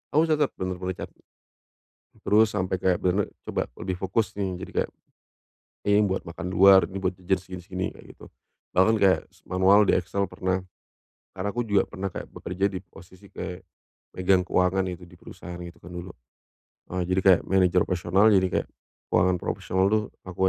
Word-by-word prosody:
Aku 155 - +6
catat, 150 -3 +2
benar-benar 95 0 -3
catat. - - -25 1.1
Terus 105 +1 +5
sampai 90 +1 -1
kayak 90 -1 +2
benar-benar 95 +2 +1 0.2
coba - - -1 0.2
lebih 90 -1 -3
fokus 95 +2 -1
nih. 95 -2 -1
Jadi - - -7
kayak, - - -3 1.0
"Ini 105 0 +5
buat 95 0 -2
makan 85 +1 -6
luar, 95 +1 +7
ini 95 +1 -6
buat 95 - +2
jajan 95 +1 +1
segini-segini," 95 0 -5
kayak - - -15
gitu. - - -14 0.5
Bahkan 105 +5 +5
kayak, 95 -2 +4
se - - -26
manual 95 +3 +5
di - - +5
Excel 95 +2 -1
pernah. 95 0 -1 0.7
Karena 95 +1 -3
aku 120 - -1
juga 100 -3 +2
pernah 100 0 -4
kayak - - -7
bekerja 95 +3 -2
di 95 - -4
posisi 95 +2 -16
kayak, 90 +1 -6 0.5
megang 90 0 +3
keuangan 90 +1 +2
gitu, 90 - -16
di 90 - -16
perusahaan 90 0 -10
gitu 85 -1 -9
kan, 90 - -11
dulu. 90 0 -7 0.8
Nah, 90 - -1
jadi 95 +1 +1
kayak 95 -2 +6
manager 90 -1 +4
profesional, 95 +4 +3
jadi 95 -1 +4
kayak - - -16 0.5
keuangan 90 0 +3
profesional 95 +1 -1
tuh, 110 - +2 0.2
aku 90 -2 -10
95 Hz, 175 wpm, -26 LUFS, 90-95 Hz, 1.1 s, luar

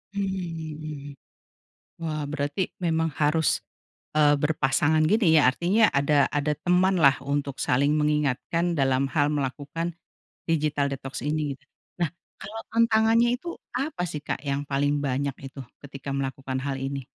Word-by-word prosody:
Mmm. 160 -7 -4 0.9
Wah, 155 -2 -2
berarti 145 +5 -2
memang 165 -1 +1
harus, 155 +1 +2 0.5
eee, 145 -1 +6
berpasangan 150 +1 +2
gini, 175 -5 +4
ya. 145 - +5
Artinya 195 - +3
ada 140 0 +3
ada 145 +1 +1
temanlah 180 -6 +4
untuk 140 -1 -2
saling 140 +4 +2
mengingatkan 150 +3 +1
dalam 135 -1 +2
hal 145 -1 +3
melakukan 145 +4 -3 0.5
digital 150 -3 +1
detox 135 -1 -6
ini, 150 -1 -1
gitu. 135 - -22 0.4
Nah, 160 - +1 0.3
kalau 215 +3 -7
tantangannya 230 0 +4
itu 340 +7 -7 0.2
apa 275 - -2
sih, 150 - -5
Kak, 135 - -3
yang 140 -1 -1
paling 145 +1 +1
banyak 140 0 -1
itu, 135 +1 -9 0.2
ketika 140 0 -8
melakukan 135 -1 -3
hal 140 -1 -2
ini? 135 -1 -4
150 Hz, 135 wpm, -26 LUFS, 140-165 Hz, 0.9 s, eee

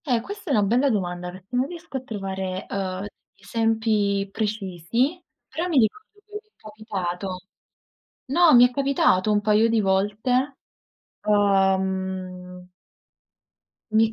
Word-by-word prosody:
Eh 250 -5 +2
questa 405 - -8
è - - +2
una 210 - +3
bella 245 +7 +2
domanda, 180 -5 -2
perché 185 +6 -9
non 255 +2 +1
riesco 335 -4 -7
a - - -5
trovare, 190 -5 -5
uhm, 190 0 -3 0.3
esempi 215 -1 0
precisi, 215 - -2 0.2
però 340 +3 -3
mi 335 -5 0
ricordo 260 - +1 0.2
che 425 - -23
mi 420 - -4
è 430 0 -33
capitato. 195 -4 -5 0.9
No, 325 +3 +5
mi 245 0 +8
è - - -16
capitato 250 -7 +2
un 205 - +3
paio 210 +2 +3
di 225 -1 +2
volte. 215 +8 0 0.7
Uhm 190 -2 0 1.2
Mi 220 0 +4
210 Hz, 130 wpm, -24 LUFS, 190-250 Hz, 1.2 s, mi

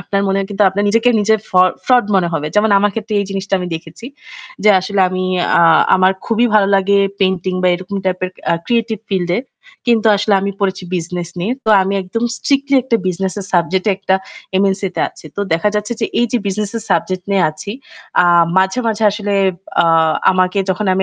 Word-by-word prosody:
আপনার 200 0 -2
মনেও 195 0 0
কিন্তু 205 +1 0
আপনার 200 +2 -2
নিজেকে 230 +3 +2
নিজের 220 0 +2
ফ - - -25 0.3
ফ্রড 245 -5 +3
মনে 180 -2 +1
হবে। 150 -1 -2
যেমন 210 +1 +3
আমার 205 +1 +1
ক্ষেত্রে 215 -1 -4
এই 200 - -3
জিনিসটা 195 0 -2
আমি 180 -1 -4
দেখেছি, 160 +7 -9 0.6
যে 210 - +7
আসলে 195 +1 -2
আমি 185 0 -3 0.4
আ - - +5 0.3
আমার 185 +1 +3
খুবই 230 +1 +2
ভালো 205 -2 +5
লাগে 200 +1 +2 0.2
পেইন্টিং 185 -1 0
বা 180 - +3
এরকম 185 +3 -6
টাইপের 185 0 -2 0.2
আ - - +3
ক্রিয়েটিভ 230 -2 0
ফিল্ডে। 180 -1 0 0.5
কিন্তু 230 -2 +2
আসলে 205 +1 +1
আমি 200 +1 -2
পড়েছি 190 -2 -1
বিজনেস 175 0 -5
নিয়ে। 210 +7 -1
তো 220 - +1
আমি 195 +1 -2
একদম 230 +6 -4
স্ট্রিক্টলি 280 0 +1
একটা 235 -2 +1
বিজনেসের 190 +2 -3
সাবজেক্টে 185 +4 +1
একটা 190 -1 0 0.5
MNC 195 0 0
তে - - 0
আছি। - - -18
তো - - -2
দেখা 190 +6 +1
যাচ্ছে 210 +3 -2
যে - - +1
এই 240 - +3
যে 245 - +2
বিজনেসের 210 +3 -3
সাবজেক্ট 185 +2 -1
নিয়ে 190 -2 +3
আছি 155 +6 -9 0.5
আ - - +3 0.3
মাঝে, 190 +6 +1
মাঝে 220 0 -2
আসলে 205 -1 -3 0.5
আ - - +1 0.5
আমাকে 185 +1 +1
যখন 195 +2 -2
আমি 190 - +1
195 Hz, 190 wpm, -16 LUFS, 185-215 Hz, 0.6 s, যে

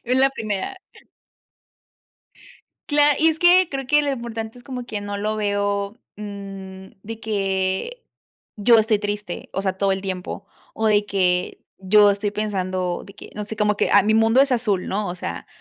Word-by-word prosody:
En 255 +2 +2
la 270 - +5
primera. 215 - -4 2.1
Cla 290 0 +4
y 320 - +4
es 320 0 +1
que 360 0 +6
creo 270 -2 -4
que 295 +2 +4
lo 290 -1 0
importante 230 -2 -5
es 245 - -15
como 250 -3 -6
que 210 -3 -5
no 205 0 -4
lo 215 +1 -1
veo, 205 0 -1 0.2
mm, 195 -2 -8 0.2
de 225 +1 -7
que 195 - -2 0.5
yo 230 +3 +5
estoy 215 -1 +2
triste, 205 -3 -5
o 195 - -1
sea, 190 -1 0
todo 195 0 +2
el 190 0 -1
tiempo, 185 -2 -5 0.3
o 220 - 0
de 205 -1 +3
que 180 -3 0 0.2
yo 205 +2 +5
estoy 200 +1 -2
pensando 185 -4 -2
de 200 - -13
que, 215 - -13
no 210 -1 -4
sé, 220 - -6
como 210 0 +1
que, - - +1
ah, - - +6
mi 215 +2 +2
mundo 225 +3 +5
es 275 0 +2
azul, 215 -7 0
¿no? 205 +1 -2
O 175 - -4
sea, 185 - -6
210 Hz, 185 wpm, -22 LUFS, 195-235 Hz, 2.1 s, que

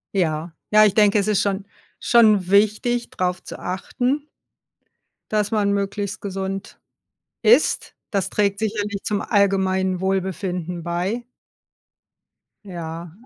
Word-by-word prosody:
Ja. 160 -2 0 0.2
Ja, 215 0 +7
ich 205 - +3
denke, 210 0 +4
es 200 - -1
ist 210 -2 +2
schon 195 -1 -1 0.3
schon 215 -6 +4
wichtig, 215 +4 +2
drauf 180 0 -2
zu - - -8
achten 250 +10 -2 1.0
dass 210 0 0
man 205 -2 +2
möglichst 200 +1 -3
gesund 195 0 -5 0.6
isst. 235 +6 +3 0.2
Das 195 -3 -1
trägt 200 -1 +1
sicherlich 205 -2 -2
zum 205 -1 -1
allgemeinen 190 -3 +1
Wohlbefinden 185 -2 -2
bei. 180 +8 -2 1.4
Ja. 170 -3 -7
200 Hz, 115 wpm, -22 LUFS, 185-210 Hz, 1.4 s, Ja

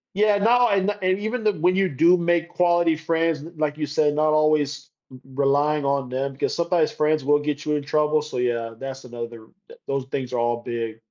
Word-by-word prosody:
yeah, 210 0 +3
no, 240 +3 +4
and 200 -1 +1
the 205 - -1
and 185 +1 +1
even 220 +3 -3
then, 210 -7 0
when 180 +2 +3
you 190 -1 +2
do 170 +6 +4
make 170 0 0
quality 175 -2 +2
friends, 160 -1 -1
l 165 - -10
like 150 -1 -1
you 150 - -2
said, 150 0 +1
not 155 0 +2
always 150 -1 +1 0.2
r 130 - -11 0.3
relying 145 +1 +1
on 140 -2 0
them 135 +2 -3
because 135 - -2
sometimes 170 -2 +1
friends 155 -1 0
will 145 +2 +3
get 145 0 -3
you 150 - 0
in 145 - -2
trouble, 150 +1 +1
so, 150 -4 -7
yeah, 115 -2 -1
that's 135 0 -7
another 115 -2 -8 0.2
t 475 - -13
those 135 -1 -2
things 130 -2 -4
are 120 - 0
all 120 0 -1
big. 115 -2 -4
150 Hz, 220 wpm, -23 LUFS, 135-170 Hz, 0.3 s, no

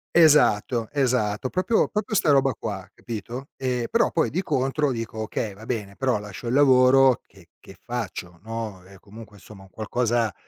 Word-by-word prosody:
Esatto, 125 -8 +4
esatto, 125 -5 0
proprio, 185 - +1
proprio 210 0 -2
'sta 155 - +3
roba 135 -2 +3
qua, 100 -4 -6
capito, 120 +4 -7
ehm, 125 -2 -1
però, 230 - +2
poi, 165 - +1
di 180 - -1
contro, 145 -2 0
dico: 115 -2 -5
“Okay, 110 -1 -3
va 110 +3 -13
bene, 105 -5 -4
però 130 -1 0
lascio 105 +3 -8
il 120 - -1
lavoro 130 -2 +5
che - - -20
che - - -14
faccio?” 95 -7 -6
No, 110 -4 -6
e, 95 0 -16
comunque, 105 0 -13
somma, 100 -1 -14
un 95 - -17
qualcosa 115 0 -1
120 Hz, 170 wpm, -24 LUFS, 105-135 Hz, -, lavoro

